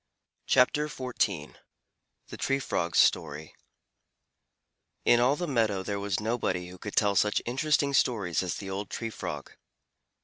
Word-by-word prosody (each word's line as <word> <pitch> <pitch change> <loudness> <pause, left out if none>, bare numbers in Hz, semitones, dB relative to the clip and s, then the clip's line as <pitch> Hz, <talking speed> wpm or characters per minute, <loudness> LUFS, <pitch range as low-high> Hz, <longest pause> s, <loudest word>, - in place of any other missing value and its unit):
THE 140 +4 +4 1.5
TREE 135 0 0
FROG'S 85 -9 -1
STORY 75 +2 +2 1.5
In 120 - +6
all 125 +4 +4
the 175 - -3
meadow 110 -8 +1
there 100 +1 -3
was 100 -2 -1
nobody 105 -5 -1
who 90 0 -12
could 105 - -7
tell 105 -2 +3
such 105 +2 +3
interesting 140 +3 +1
stories 105 -10 +1
as 90 -2 -2
the 95 -1 -6
old 100 0 -4
Tree 115 +5 -4
Frog. - - -6
105 Hz, 130 wpm, -28 LUFS, 95-125 Hz, 1.5 s, In